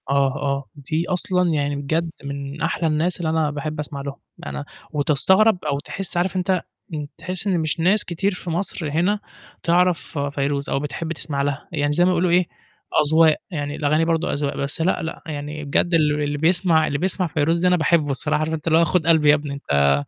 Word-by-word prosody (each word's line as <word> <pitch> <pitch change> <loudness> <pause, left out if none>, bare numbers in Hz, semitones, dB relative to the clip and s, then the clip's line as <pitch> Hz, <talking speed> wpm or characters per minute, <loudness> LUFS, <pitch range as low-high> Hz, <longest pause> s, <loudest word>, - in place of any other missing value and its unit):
آه، - - +2 0.3
آه، 140 -1 -2
دي 155 +4 -2
أصلًا 180 0 +1
يعني 145 -2 0
بجد 160 +4 -1
من 140 +1 -6
أحلى 165 0 0
الناس 160 +3 +1
اللي 165 -2 -1
أنا 160 -2 +1
باحب 150 +1 -4
أسمع 145 -1 -5
لهم. 140 0 -5 0.3
أنا 145 - -5 0.3
وبقيت 150 +1 -2
استغرب 190 +6 +4
أو 140 -2 0
تحس 190 +4 -5
عارف 175 +1 0
أنت 185 -1 +1 0.3
إن 150 -2 -4
تحس 180 +3 -4
إن 185 -3 +2
مش 155 0 -1
ناس 190 +6 +3
كتير 190 +4 -1
في 180 -1 -7
مصر 170 -2 -2
هنا 180 +8 +1 0.4
تعرف 175 -1 +1
فيروز 140 0 -1
أو - - +1
بتحب 155 +3 -4
تسمع 145 -3 -3
لها، 140 0 -2
يعني 145 -3 0
زي 175 +4 +3
ما 185 - +3
يقولوا 180 0 +2
إيه، 175 0 +3 0.6
أذواق، 160 +1 +5 0.2
يعني 145 -3 -3
الأغاني 155 +2 +2
برضه 165 -1 0
أذواق، 145 -1 -2
بس 140 +3 -3
لأ، 180 +3 +1
لأ، 160 - -5
يعني 150 -1 -5
بجد 170 +5 +1
ال 150 -2 +3
اللي 145 0 -1
بيسمع 165 0 +3
اللي 140 - -1
بيسمع 185 +2 0
فيروز 155 +2 +1
ده 180 - +2
أنا 180 0 +4
باحبّه 155 -1 +2
الصراحة، 150 +3 0
عارف 155 +1 -1
أنت 160 0 -4
اللي 160 0 +5
هو 170 - +5
خُد 165 +1 0
قلبي 160 -3 +5
يا 145 - +8
ابني 145 -1 -4
أنت 70 - +2
160 Hz, 210 wpm, -22 LUFS, 145-175 Hz, 0.6 s, يا